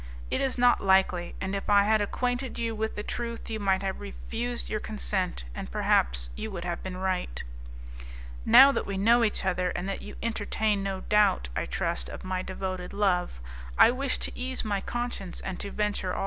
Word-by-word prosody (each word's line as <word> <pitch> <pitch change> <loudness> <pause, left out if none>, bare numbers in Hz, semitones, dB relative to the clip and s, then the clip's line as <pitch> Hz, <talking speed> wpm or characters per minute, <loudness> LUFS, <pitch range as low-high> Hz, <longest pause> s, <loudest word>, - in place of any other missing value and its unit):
It - - +1
is 270 -1 0
not 245 0 +4
likely, 190 -2 +3
and 190 +1 -3
if 200 +1 -3
I 200 -1 +6
had 215 +1 +3
acquainted 245 +4 -2
you 230 -1 -1
with 220 0 -2
the 210 - -4
truth, 235 0 -4
you 220 - -2
might 195 -1 +1
have 190 -1 -2
refused 235 +4 -4
your 215 - -2
consent, 200 - -2
and 65 - -6
perhaps - - +1
you 220 - -4
would 175 -4 -6
have 175 -1 -3
been 185 -1 -5
right. 185 - -2 1.0
"Now 275 - +9
that - - -2
we 200 -1 -3
know 230 +4 +5
each 210 -3 0
other, 180 -1 +1
and 180 - -3
that 195 - -3
you - - -9
entertain 215 -2 0
no 195 -1 -3
doubt, 205 - +3
I - - -1
trust, 60 0 -1
of - - -8
my 185 0 -2
devoted 185 -1 -5
love, 180 - +1 0.4
I - - +8
wish 265 +1 -1
to - - -6
ease 255 -1 -3
my 200 -2 0
conscience 240 -6 -4
and 190 -2 -5
to 200 - -4
venture 205 -3 -1
all. - - -3
200 Hz, 200 wpm, -28 LUFS, 185-225 Hz, 1.0 s, Now